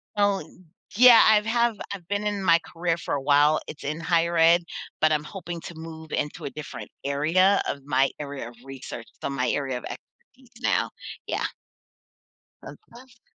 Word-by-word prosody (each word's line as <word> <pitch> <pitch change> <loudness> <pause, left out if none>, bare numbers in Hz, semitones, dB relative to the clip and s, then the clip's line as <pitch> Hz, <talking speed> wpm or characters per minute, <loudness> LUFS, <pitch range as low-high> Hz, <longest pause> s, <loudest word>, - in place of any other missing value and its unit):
So, 205 -1 +2 0.5
yeah, 245 0 +9
I've 210 -1 +5
have 235 0 +2 0.2
I've 180 -4 -9
been 205 +2 -2
in 205 -2 -2
my 170 -2 +5
career 170 0 0
for - - -4
a 140 - -1
while, 145 +2 +4
it's 150 - -9
in 155 +3 -3
higher 170 0 +1
ed, 170 +2 +5 0.4
but 155 - +4
I'm 150 -1 +1
hoping 175 -1 -7
to 170 - -9
move 160 0 -10
into 145 - -3
a - - -2
different 150 +1 -8
area 165 +8 +3
of 140 - -3
my 135 -1 +2
area 140 -4 -6
of 120 - -16
research, 135 -3 -8 0.2
so - - -2
my 130 -2 -1
area 135 -2 -1
of - - -9
expertise 255 -2 -13
now. - - +1 0.4
Yeah. - - -2 1.2
A - - -9
task 245 0 -17
165 Hz, 175 wpm, -25 LUFS, 145-200 Hz, 1.2 s, yeah